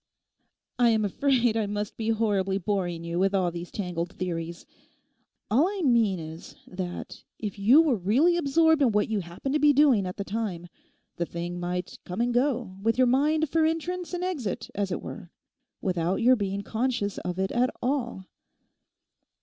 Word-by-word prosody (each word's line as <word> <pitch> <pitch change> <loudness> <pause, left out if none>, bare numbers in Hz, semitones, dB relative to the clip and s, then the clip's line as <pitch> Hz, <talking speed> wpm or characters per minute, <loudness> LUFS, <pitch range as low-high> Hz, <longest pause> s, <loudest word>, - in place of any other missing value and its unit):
I 240 -1 +5
am 220 -2 +2
afraid 245 +2 +2
I 220 -2 0
must 205 0 -3
be 225 0 -3
horribly 205 -4 +1
boring 180 -3 -2
you 170 +1 -3
with 195 +1 +2
all 180 -2 +1
these 170 0 -7
tangled 175 -3 -3
theories. 170 -2 -4 0.9
All 275 +10 +4
I 395 -2 -3
mean 230 -7 +3
is, 160 0 -9
that 180 -1 -6
if 210 -2 -5
you 250 +11 +6
were 280 -8 +2
really 250 - +3
absorbed 320 0 +3
in 245 -6 +4
what 210 +1 +1
you 220 -2 0
happened 180 +10 -5
to 300 - +2
be 295 0 +5
doing 265 -9 +4
at 180 - -6
the 200 - -2
time, 195 -5 -4 0.5
the 170 - 0
thing 175 +1 -5
might 180 +1 -4
come 180 +4 -6
and 240 +1 +1
go, 245 -6 0
with 225 +3 +1
your 255 - +5
mind 300 +5 +2
for 320 +3 +1
entrance 335 +3 -1
and 355 - -3
exit, 290 - -3
as 200 -1 -2
it - - -3
were, 175 - -8 0.5
without 180 -1 0
your 245 +4 +4
being 200 -2 -3
conscious 225 -3 -1
of 180 0 -4
it 190 0 -1
at 250 +1 +2
all. 240 -7 -2
210 Hz, 180 wpm, -27 LUFS, 185-260 Hz, 0.9 s, you